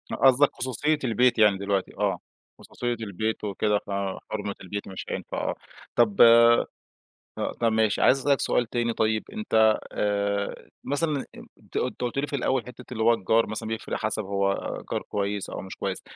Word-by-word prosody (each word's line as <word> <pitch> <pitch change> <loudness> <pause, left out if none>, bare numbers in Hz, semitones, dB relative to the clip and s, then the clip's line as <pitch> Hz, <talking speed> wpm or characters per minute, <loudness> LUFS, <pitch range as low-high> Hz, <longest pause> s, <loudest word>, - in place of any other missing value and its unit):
قصدَك 135 +2 +5
خصوصية 145 +5 0
البيت 125 0 +2
يعني 105 -2 +5
دلوقتي 100 -1 -1
آه، - - 0 0.4
خصوصية 120 -1 -4
البيت 110 -1 -3
وكده 105 0 0
فحُرمِة 100 +1 -4
البيت، 100 +2 -5
فمش 95 - -7
هينفع - - -5
آه. - - -2 0.4
طَب 110 -4 +3
آآ، 115 0 +9 1.2
طَب 115 -1 +2
ماشي، 110 -1 +2
عايز 135 - +5
أسأل 135 +2 -1
لك 140 - +2
سؤال 125 - +1
تاني 120 -1 0
طيب، 110 -1 +1
أنت 110 - +3
آآ، 100 -1 -1 0.2
مثلًا 145 -1 -1 0.3
أنت - - -12
أنت - - -2
قُلت 125 +2 -2
لي 140 - 0
في 145 - -3
الأول 130 -3 0
حتة 125 0 -11
اللي 110 -2 -2
هو 115 +1 +5
الجار 115 +2 +2
مثلًا 110 +1 -5
بيفرق 110 0 -3
حَسَب 110 0 -2
هو 100 0 0 0.4
جار - - -1
كويّس 100 -1 -3
أو - - -5
مش 95 - -9
كويّس - - -3
110 Hz, 170 wpm, -26 LUFS, 100-125 Hz, 1.2 s, آآ